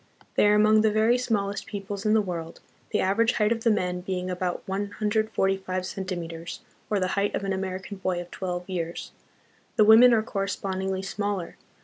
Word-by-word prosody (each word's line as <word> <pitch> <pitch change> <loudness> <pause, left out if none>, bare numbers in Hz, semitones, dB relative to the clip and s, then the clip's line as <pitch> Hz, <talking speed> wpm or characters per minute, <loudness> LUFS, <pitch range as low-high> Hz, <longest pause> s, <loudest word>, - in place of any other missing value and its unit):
They - - +4
are 210 - +5
among 215 +1 +5
the 220 - +4
very 220 +3 +3
smallest 205 -5 -1
peoples 200 0 -5
in 215 - +4
the 215 - +3
world, 170 -3 -5 0.3
the - - +1
average 225 +5 +2
height 210 0 +2
of 230 -1 -1
the 230 - +4
men 180 -4 0
being 185 0 -3
about 180 0 -3
145 195 -2 -1
centi 185 0 -4
meters, 165 0 -7 0.3
or 210 - +1
the 185 -1 0
height 200 +1 0
of - - -3
an 195 -1 -1
American 190 +1 -4
boy 185 -2 -1
of 175 0 -8
twelve 180 -1 -4
years; 170 -3 -4 0.6
the 215 - +5
women 225 +3 +8
are 220 -2 +3
correspondingly 190 -2 -2
smaller. 200 -2 -3
195 Hz, 180 wpm, -26 LUFS, 185-210 Hz, 0.6 s, women